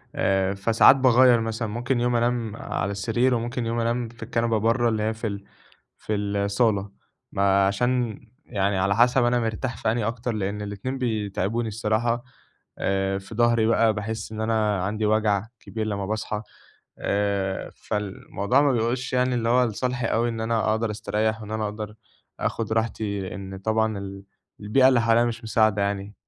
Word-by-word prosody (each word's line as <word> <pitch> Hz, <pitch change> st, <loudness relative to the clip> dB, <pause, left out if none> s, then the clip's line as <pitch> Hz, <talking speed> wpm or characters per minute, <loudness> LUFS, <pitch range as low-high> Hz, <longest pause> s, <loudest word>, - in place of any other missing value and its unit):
آآ 95 Hz, 0 st, +1 dB
فساعات 110 Hz, +6 st, +5 dB
باغيّر 130 Hz, -2 st, +5 dB
مثلًا، 115 Hz, 0 st, -2 dB
ممكن 120 Hz, +3 st, -1 dB
يوم 120 Hz, 0 st, +1 dB
أنام 120 Hz, -2 st, 0 dB
على 100 Hz, -3 st, -3 dB
السرير 115 Hz, +6 st, +1 dB
وممكن 120 Hz, +1 st, -2 dB
يوم 115 Hz, +1 st, -1 dB
أنام 115 Hz, 0 st, -1 dB
في 115 Hz, -, -11 dB
الكنبة 115 Hz, -1 st, 0 dB
برّه، 115 Hz, +2 st, +2 dB
اللي 110 Hz, -1 st, -1 dB
هي 110 Hz, +1 st, 0 dB
في 110 Hz, +1 st, -4 dB
ال 100 Hz, -1 st, -5 dB, 0.6 s
في 110 Hz, -, -3 dB
الصالة، 100 Hz, 0 st, 0 dB, 0.4 s
ما 100 Hz, 0 st, +3 dB
عشان 120 Hz, +2 st, 0 dB, 0.3 s
يعني 100 Hz, -1 st, 0 dB
على 100 Hz, +2 st, +1 dB
حسب 120 Hz, +2 st, +4 dB
أنا 120 Hz, 0 st, +2 dB
مرتاح 115 Hz, +2 st, -2 dB
في 110 Hz, 0 st, 0 dB
أنهي 115 Hz, -2 st, -1 dB
أكتر، 115 Hz, +2 st, -2 dB
لأن 105 Hz, 0 st, -3 dB
الاتنين 105 Hz, +6 st, -4 dB
بيتعِبوني 110 Hz, -1 st, -1 dB
الصراحة 115 Hz, +3 st, 0 dB, 0.5 s
آآ، 95 Hz, 0 st, 0 dB
في 95 Hz, +3 st, -11 dB
ضهري 115 Hz, -1 st, +3 dB
بقى 115 Hz, -1 st, +3 dB
باحس 110 Hz, +1 st, -4 dB
إن 110 Hz, -, -5 dB
أنا 110 Hz, -3 st, +1 dB
عندي 105 Hz, +2 st, -1 dB
وجَع 105 Hz, -1 st, +2 dB
كبير 110 Hz, +2 st, -4 dB
لمّا 100 Hz, -2 st, -2 dB
باصحى 110 Hz, 0 st, -3 dB, 0.6 s
آآ، 100 Hz, -1 st, -1 dB
فالموضوع 105 Hz, +4 st, -1 dB
ما 140 Hz, -, +3 dB
بيؤولش 125 Hz, +2 st, -1 dB
يعني 125 Hz, 0 st, +2 dB
اللي 115 Hz, -1 st, 0 dB
هو 125 Hz, +1 st, +4 dB
لصالحي 125 Hz, +2 st, -2 dB
أوي 115 Hz, +2 st, +1 dB
إن 115 Hz, -1 st, -4 dB
أنا 110 Hz, -1 st, 0 dB
أقدَر 110 Hz, 0 st, 0 dB
أستريّح 110 Hz, +1 st, -1 dB
وإن 105 Hz, -, -9 dB
أنا 110 Hz, 0 st, -1 dB
أقدَر 105 Hz, 0 st, -5 dB, 0.5 s
آخُد 110 Hz, -1 st, -2 dB
راحتي 105 Hz, -4 st, -2 dB
إن 95 Hz, -1 st, -7 dB
طبعًا 110 Hz, +1 st, 0 dB
ال 100 Hz, 0 st, -8 dB, 0.4 s
البيئة 130 Hz, +6 st, +4 dB
اللي 130 Hz, -3 st, +4 dB
حواليّا 115 Hz, 0 st, +4 dB
مش 115 Hz, 0 st, -3 dB
مساعدة 110 Hz, -2 st, +2 dB
يعني. 100 Hz, 0 st, -2 dB
110 Hz, 170 wpm, -25 LUFS, 100-120 Hz, 0.6 s, فساعات